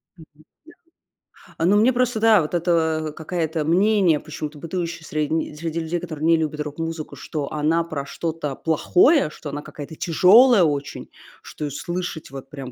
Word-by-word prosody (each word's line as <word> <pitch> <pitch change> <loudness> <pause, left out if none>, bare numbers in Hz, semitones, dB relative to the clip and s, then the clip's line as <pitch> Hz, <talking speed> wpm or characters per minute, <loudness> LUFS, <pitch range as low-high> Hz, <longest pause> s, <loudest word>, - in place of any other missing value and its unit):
Мгм, 160 - -15 1.1
да. - - -20
А, 165 - 0
ну, 195 - +4
мне 235 +4 +4
просто, 245 -2 0
да, 220 -3 +5
вот 155 +2 -5
это, 160 -2 +1
а, - - -5
какое-то 160 0 -3
мнение, 185 -2 +3
почему-то 150 0 -7
бытующее 170 0 -4
средни 155 +1 -2
среди 165 +1 -4
людей, 165 +2 -2
которые 155 -3 -5
не 165 0 +5
любят 155 -1 -3
рок-музыку, 155 +1 -5
что 150 -3 -5
она 155 +3 +1
про 155 -4 -5
что-то 155 -2 -4
плохое, 175 - +3
что 150 - -9
она 145 +1 -5
какая-то 150 +1 -9
тяжёлая 195 +7 +5
очень, 145 -3 -2 0.3
что 150 - -7
её 145 - -4
слышать 175 -4 -5
вот 135 0 -9
прям 135 -3 -8
160 Hz, 170 wpm, -22 LUFS, 150-175 Hz, 1.1 s, да